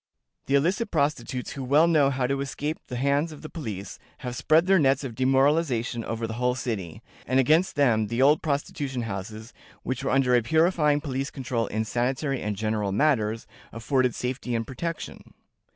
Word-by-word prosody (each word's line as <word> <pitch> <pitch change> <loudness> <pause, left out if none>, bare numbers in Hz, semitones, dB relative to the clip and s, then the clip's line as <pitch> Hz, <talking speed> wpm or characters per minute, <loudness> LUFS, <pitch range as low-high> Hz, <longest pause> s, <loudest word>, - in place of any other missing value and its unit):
The 135 - +2
illicit 185 - +1
prostitutes, 140 - -1
who 135 - -6
well 145 +5 +4
know 155 -5 +4
how 130 -2 -1
to 135 +2 -1
escape 145 +3 -3
the 125 - -6
hands 140 +5 +1
of 155 - -11
the 155 - -8
police, 105 - -6 0.3
have 125 -1 -4
spread 155 +5 +3
their 190 -1 +4
nets 135 -1 +2
of 130 -4 -5
demoralization 130 -2 +1
over 115 0 -3
the 110 - -5
whole 125 0 +2
city; 105 -10 -5 0.2
and 130 +2 +2
against 160 +8 +3
them, 115 -7 +3
the 115 +3 -3
old 145 +3 +5
prostitution 140 -3 -2
houses, 110 +2 -6 0.3
which 130 +1 -3
were 135 - -1
under 130 -2 +3
a 120 - +5
purifying 155 +2 +2
police 135 -2 -3
control 120 -3 -2
in 110 +1 -2
sanitary 130 +4 -1
and 105 -1 -2
general 110 -1 -1
matters, 115 -3 +1 0.3
afforded 125 +1 0
safety 125 -1 -3
and 115 0 -1
protection." 165 +7 -6
130 Hz, 180 wpm, -26 LUFS, 115-145 Hz, 0.3 s, old